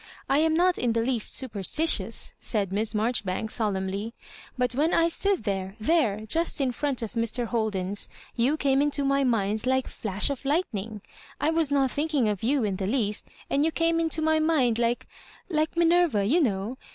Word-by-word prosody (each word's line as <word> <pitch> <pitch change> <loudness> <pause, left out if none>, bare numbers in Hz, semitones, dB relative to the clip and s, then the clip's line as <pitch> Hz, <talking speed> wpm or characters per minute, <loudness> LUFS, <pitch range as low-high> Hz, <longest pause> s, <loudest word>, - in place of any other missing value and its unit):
I 275 +2 +3
am 320 0 +2
not 360 +2 +3
in 240 -2 +1
the 230 - +1
least 235 -2 -2
superstitious," 260 - -1
said 200 -4 0
Miss 215 +2 -1
Marjoribanks, 215 -2 -1
solemnly; 200 +1 -2 0.4
"but 250 0 0
when 300 +6 +2
I 335 - +4
stood 385 - +1
there 195 -2 -3
— - - -33
^there, 220 -5 +1
just 330 +6 +1
in 265 -2 +1
front 270 -1 -2
of 220 - -6
Mr. 230 +1 -1
Holden's 205 -4 -1
— - - -25
^you 295 +4 +2
came 275 -2 +2
into 285 -1 +1
my 275 0 +2
mind 220 -2 0
like 260 0 +2
a - - -9
flash 210 +4 -1
of 280 - -5
lightning. 225 - -2 0.4
I 310 - +1
was 325 -3 +1
not 270 -2 +2
thinking 295 -5 0
of 205 -3 -2
you 265 +2 +1
in 200 -3 -1
the 190 - -2
least, 210 -3 -1 0.2
and 280 - +1
you 320 - +3
came 330 +1 +1
into 320 -1 0
my 315 0 +3
mind 290 -8 +2
like^ 235 0 +1 0.5
like 310 +1 0
Minerva, 340 - +3
you 310 - +3
know. 215 -1 -1
250 Hz, 195 wpm, -26 LUFS, 215-310 Hz, 0.5 s, I